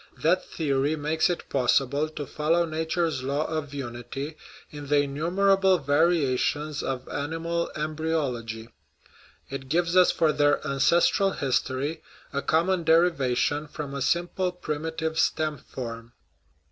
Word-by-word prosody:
That 180 Hz, +4 st, +2 dB
theory 145 Hz, -1 st, 0 dB
makes 155 Hz, +2 st, +1 dB
it 175 Hz, -, -3 dB
possible 140 Hz, +3 st, +1 dB
to 150 Hz, -2 st, -6 dB
follow 160 Hz, +5 st, +1 dB
nature's 160 Hz, -1 st, -1 dB
law 140 Hz, +4 st, -1 dB
of 155 Hz, -3 st, -3 dB
unity 135 Hz, +2 st, -6 dB, 0.4 s
in 145 Hz, -1 st, -8 dB
the 145 Hz, 0 st, +4 dB
innumerable 190 Hz, +6 st, +2 dB
variations 150 Hz, -1 st, +1 dB
of 130 Hz, -1 st, -4 dB
animal 165 Hz, +3 st, -2 dB
embryology; 145 Hz, -8 st, -2 dB, 0.8 s
it 135 Hz, -1 st, -6 dB
gives 170 Hz, +2 st, +1 dB
us 185 Hz, -1 st, +7 dB
for 155 Hz, -2 st, +2 dB
their 145 Hz, 0 st, +3 dB
ancestral 170 Hz, +7 st, +3 dB
history 135 Hz, +3 st, -1 dB, 0.3 s
a 140 Hz, -, 0 dB
common 170 Hz, +4 st, +1 dB
derivation 150 Hz, -3 st, +2 dB
from 145 Hz, -2 st, -6 dB
a 140 Hz, -, -4 dB
simple 175 Hz, +5 st, 0 dB
primitive 160 Hz, -1 st, -3 dB
stem 155 Hz, -3 st, +1 dB
form. 115 Hz, -2 st, -8 dB
150 Hz, 120 wpm, -26 LUFS, 140-165 Hz, 0.8 s, us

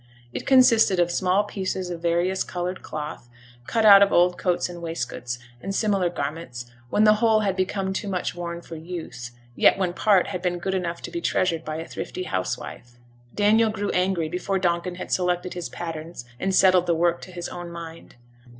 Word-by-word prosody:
It -, -, -5 dB
consisted 230 Hz, -7 st, +5 dB
of 175 Hz, 0 st, +2 dB
small 185 Hz, +3 st, +2 dB
pieces 190 Hz, -3 st, -4 dB
of 170 Hz, -1 st, -6 dB
various 175 Hz, +3 st, +1 dB
coloured 180 Hz, +1 st, -4 dB
cloth, 150 Hz, -5 st, -7 dB, 0.4 s
cut 225 Hz, -1 st, +1 dB
out 200 Hz, -2 st, +10 dB
of 200 Hz, -, +5 dB
old 180 Hz, +1 st, +4 dB
coats 180 Hz, -1 st, 0 dB
and 175 Hz, -1 st, -9 dB
waistcoats, 125 Hz, -7 st, -4 dB, 0.2 s
and 195 Hz, +1 st, -4 dB
similar 200 Hz, -5 st, +1 dB
garments, 140 Hz, -6 st, -5 dB, 0.2 s
when 210 Hz, -, +3 dB
the 215 Hz, 0 st, +7 dB
whole 220 Hz, -2 st, +4 dB
had 195 Hz, -3 st, 0 dB
become 190 Hz, 0 st, -1 dB
too 205 Hz, +2 st, -3 dB
much 185 Hz, -2 st, -2 dB
worn 170 Hz, -1 st, -5 dB
for 165 Hz, -, -9 dB
use, 160 Hz, -7 st, -7 dB, 0.3 s
yet -, -, +5 dB
when 185 Hz, -2 st, -1 dB
part 195 Hz, -1 st, +3 dB
had 180 Hz, -2 st, -4 dB
been 180 Hz, -1 st, -1 dB
good 190 Hz, +2 st, -3 dB
enough 175 Hz, -2 st, -3 dB
to -, -, -6 dB
be 170 Hz, 0 st, -4 dB
treasured 165 Hz, -3 st, 0 dB
by 155 Hz, -1 st, -4 dB
a 165 Hz, +1 st, -5 dB
thrifty 185 Hz, -, -5 dB
housewife. 120 Hz, -, -4 dB, 0.4 s
Daniel 215 Hz, +2 st, +4 dB
grew 205 Hz, -1 st, -2 dB
angry 180 Hz, -3 st, +1 dB
before 180 Hz, +4 st, -2 dB
Donkin 175 Hz, -1 st, -1 dB
had 185 Hz, -, -7 dB
selected 180 Hz, 0 st, 0 dB
his 175 Hz, -2 st, -5 dB
patterns 165 Hz, -5 st, -7 dB
and 190 Hz, 0 st, 0 dB
settled 185 Hz, -2 st, +5 dB
the 170 Hz, -, +2 dB
work 170 Hz, +1 st, +1 dB
to 185 Hz, -, -10 dB
his 175 Hz, -1 st, -5 dB
own 175 Hz, -1 st, -7 dB
mind. 165 Hz, -1 st, -10 dB
180 Hz, 195 wpm, -24 LUFS, 170-190 Hz, 0.4 s, out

